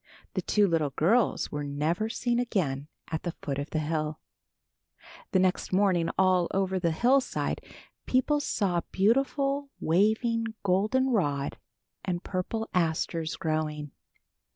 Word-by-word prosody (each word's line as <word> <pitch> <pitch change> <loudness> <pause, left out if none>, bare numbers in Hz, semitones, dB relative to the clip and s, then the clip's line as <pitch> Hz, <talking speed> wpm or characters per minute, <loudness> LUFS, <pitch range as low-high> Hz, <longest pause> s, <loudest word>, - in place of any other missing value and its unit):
The - - -1
two 210 -1 +3
little 160 -4 +1
girls 200 - +2
were 145 0 -3
never 155 +9 -1
seen 240 +1 0
again 155 - -1 0.2
at 160 - -1
the 175 -1 -4
foot 140 -1 -2
of 145 - -4
the - - -2
hill. 155 0 -1 1.1
The 190 - +3
next 185 -1 +1
morning 185 -3 +3
all 185 -2 +4
over 190 -1 0
the 170 -2 +1
hillside 250 +11 +1 0.4
people 260 +4 +2
saw 190 -11 0
beautiful, 275 +7 +1
waving 220 +5 +1
golden 215 +8 +2
rod 145 - 0 0.4
and 175 -2 -2
purple 220 +4 -3
asters 165 -1 0
growing. 155 -3 -2
185 Hz, 130 wpm, -28 LUFS, 160-225 Hz, 1.1 s, all